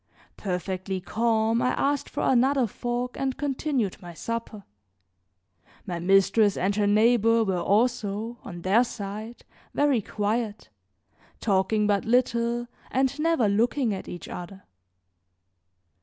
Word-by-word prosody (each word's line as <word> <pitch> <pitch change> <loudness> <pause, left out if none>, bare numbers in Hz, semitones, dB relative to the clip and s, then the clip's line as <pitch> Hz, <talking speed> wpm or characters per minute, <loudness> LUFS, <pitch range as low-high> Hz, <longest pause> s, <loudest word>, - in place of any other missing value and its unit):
Perfectly 185 0 -3
calm, 225 +3 +1
I 250 - +1
asked 285 0 0
for - - -4
another 265 +1 +3
fork 245 +3 -3
and 265 -1 -1
continued 275 - -1
my 175 -2 -10
supper. 230 0 -5 1.2
My 175 -4 -4
mistress 195 +3 +3
and 195 +2 0
her 205 -1 +2
neighbor 230 +2 +4
were 190 -4 0
also, 225 +1 0
on 175 -2 -8
their 205 +6 +4
side, 215 0 -7 0.3
very 285 -5 +3
quiet, 210 - -2 0.7
talking 210 +1 +1
but 205 -1 +2
little 235 0 +1 0.2
and 265 +2 0
never 325 -8 +2
looking 230 +3 +1
at 190 - -6
each 175 -2 -7
other. 185 +2 -8
220 Hz, 120 wpm, -26 LUFS, 195-245 Hz, 1.2 s, neighbor